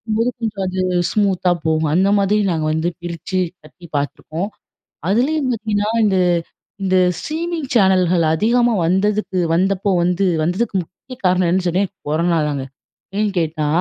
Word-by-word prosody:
அப்பம்போது 225 Hz, +2 st, 0 dB
கொஞ்சம் 210 Hz, -4 st, -3 dB
அது 185 Hz, 0 st, -2 dB, 0.3 s
ஸ்மூத்தா 195 Hz, -4 st, +1 dB, 0.2 s
போகும். 160 Hz, -1 st, +1 dB
அந்த 190 Hz, +3 st, +3 dB
மாதிரி 200 Hz, +2 st, +2 dB
நாங்க 160 Hz, -2 st, -1 dB
வந்து 160 Hz, +2 st, 0 dB
பிரிச்சு 175 Hz, +2 st, -4 dB, 0.3 s
கட்டி 170 Hz, +3 st, -14 dB
பாத்துருக்கோம். 155 Hz, +5 st, -3 dB, 0.6 s
அதுலயும் 265 Hz, +6 st, +1 dB
பாத்தீங்கன்னா 210 Hz, -2 st, -1 dB, 0.2 s
இந்த 195 Hz, -2 st, +2 dB, 0.7 s
இந்த 185 Hz, -1 st, +1 dB, 0.2 s
ஸ்ட்ரீமிங் 325 Hz, -2 st, -3 dB
சேனல்கள் 185 Hz, -5 st, +3 dB
அதிகமா 235 Hz, +6 st, +2 dB
வந்ததுக்கு 190 Hz, +2 st, 0 dB
வந்தப்போ 195 Hz, +3 st, +1 dB
வந்து 180 Hz, +2 st, +1 dB, 0.2 s
வந்ததுக்கு 190 Hz, +7 st, -1 dB
முக்கிய 190 Hz, +9 st, -12 dB
காரணம் 180 Hz, 0 st, +3 dB
என்னன்னு 180 Hz, 0 st, +1 dB
சொன்னேன் 185 Hz, +3 st, 0 dB, 0.2 s
கொரனாதாங்க. 155 Hz, -3 st, 0 dB, 0.5 s
ஏன்னு 210 Hz, -1 st, +2 dB
கேட்டா 155 Hz, -2 st, -1 dB
190 Hz, 130 wpm, -19 LUFS, 170-215 Hz, 0.7 s, அந்த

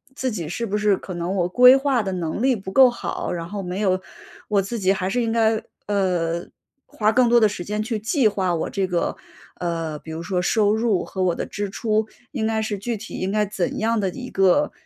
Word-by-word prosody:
自 260 Hz, -2 st, -1 dB
己 175 Hz, -9 st, -4 dB
是 230 Hz, +8 st, -3 dB
不 210 Hz, +1 st, -1 dB
是 210 Hz, -1 st, +3 dB
可 185 Hz, -1 st, -8 dB
能 175 Hz, +3 st, -2 dB
我 175 Hz, 0 st, +1 dB
规 250 Hz, +5 st, +8 dB
划 270 Hz, -4 st, +1 dB
的 195 Hz, -, -3 dB
能 180 Hz, +4 st, -3 dB
力 265 Hz, -1 st, +3 dB
不 195 Hz, -3 st, -7 dB
够 260 Hz, +4 st, +7 dB
好， 240 Hz, -, -4 dB
然 170 Hz, -1 st, -5 dB
后 205 Hz, -1 st, -4 dB
没 180 Hz, +1 st, -4 dB
有 190 Hz, -3 st, +2 dB, 0.5 s
我 205 Hz, -2 st, +2 dB
自 205 Hz, +5 st, -4 dB
己 195 Hz, -2 st, +2 dB
还 185 Hz, -1 st, -2 dB
是 245 Hz, +4 st, 0 dB
应 225 Hz, -, -1 dB
该， 225 Hz, -1 st, +2 dB, 0.2 s
呃， 175 Hz, -4 st, 0 dB, 0.4 s
花 215 Hz, 0 st, 0 dB
更 250 Hz, +1 st, +4 dB
多 240 Hz, 0 st, +6 dB
的 215 Hz, -2 st, +4 dB
时 180 Hz, -3 st, -6 dB
间 210 Hz, +2 st, -2 dB
去 225 Hz, +1 st, -2 dB
计 225 Hz, +4 st, +2 dB
划， 190 Hz, -4 st, 0 dB
我 165 Hz, -, -2 dB
这 195 Hz, -1 st, -1 dB
个， 175 Hz, -2 st, -1 dB, 0.4 s
呃， 165 Hz, -3 st, -3 dB
比 160 Hz, -, -10 dB
如 160 Hz, +1 st, -5 dB
说 180 Hz, +1 st, -1 dB
收 210 Hz, +2 st, +2 dB
入 220 Hz, -5 st, +1 dB
和 190 Hz, -, -3 dB
我 180 Hz, -2 st, +2 dB
的 -, -, -3 dB
支 205 Hz, 0 st, -3 dB
出， 215 Hz, +1 st, 0 dB, 0.2 s
应 235 Hz, -7 st, -2 dB
该 220 Hz, 0 st, 0 dB
是 215 Hz, -1 st, -2 dB
具 230 Hz, +4 st, -3 dB
体 220 Hz, -, -9 dB
应 190 Hz, +1 st, -2 dB
该 210 Hz, 0 st, +2 dB
怎 195 Hz, -3 st, -2 dB
样 225 Hz, 0 st, +1 dB
的 195 Hz, -, 0 dB
一 250 Hz, +7 st, -7 dB
个 195 Hz, +10 st, +3 dB
205 Hz, 255 characters per minute, -22 LUFS, 185-225 Hz, 0.5 s, 规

